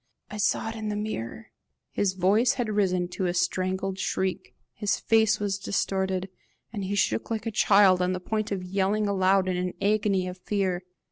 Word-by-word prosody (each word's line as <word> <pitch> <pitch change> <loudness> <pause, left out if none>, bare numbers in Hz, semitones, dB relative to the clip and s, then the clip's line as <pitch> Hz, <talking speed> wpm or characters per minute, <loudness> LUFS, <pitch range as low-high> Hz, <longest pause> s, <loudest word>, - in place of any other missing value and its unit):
I 210 - -5
saw 210 +1 +1
it 225 - -6
in 215 -1 -4
the 210 - -2
mirror!" 115 - -5 0.4
His 195 -2 0
voice 200 +6 +3
had 245 -4 -2
risen 185 -4 +1
to 185 +1 -2
a 175 - -1
strangled 185 +1 -1
shriek, 190 -1 -2 0.2
his 210 -2 -1
face 220 -1 +3
was 200 -1 -1
distorted, 190 -1 -1 0.5
and 205 -3 -3
he 195 +2 -2
shook 115 - 0
like 220 -1 -3
a 225 - -2
child 200 -3 +5
on 180 0 +1
the 185 - -2
point 215 +3 -3
of 190 -2 -2
yelling 195 +3 0
aloud 190 -1 +2
in 185 -1 0
an 180 0 -2
agony 200 -2 +1
of 180 0 -7
fear. 190 -2 -1
195 Hz, 190 wpm, -26 LUFS, 185-210 Hz, 0.5 s, child